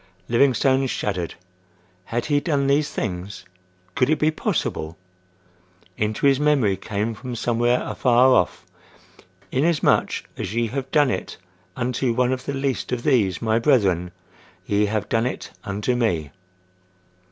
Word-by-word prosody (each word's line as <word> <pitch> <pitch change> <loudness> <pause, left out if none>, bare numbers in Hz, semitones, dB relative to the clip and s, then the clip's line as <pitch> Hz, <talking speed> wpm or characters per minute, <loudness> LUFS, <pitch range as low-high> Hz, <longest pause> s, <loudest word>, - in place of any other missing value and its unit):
Livingstone 130 +2 +3
shuddered. 90 -8 -3 0.7
Had 120 +1 -2
he 145 -1 +2
done 145 -2 0
these 140 +2 +2
things? 95 0 -5 0.5
Could 130 -1 +1
it 155 - +3
be 155 +1 +2
possible? 80 - -2 1.0
Into 110 +4 -1
his 135 -1 +4
memory 140 -9 +3
came 105 +3 -3
from 125 +2 -7
somewhere 120 +1 +1
afar 125 +1 +3
off: 90 -6 +1 0.9
"Inasmuch 150 +3 +2
as 95 +4 -4
ye 115 -1 0
have 135 +1 -4
done 145 -3 +3
it 95 - -4 0.4
unto 125 0 -1
one 125 +1 +2
of 130 0 -5
the 140 - -3
least 135 -2 -2
of 120 -1 -2
these 110 - +2
my 110 0 +2
brethren, 100 - +2 0.6
ye 105 +1 +1
have 105 0 -2
done 115 +2 +1
it - - -6
unto 105 +3 -1
me." 85 - 0
120 Hz, 140 wpm, -23 LUFS, 105-135 Hz, 1.0 s, his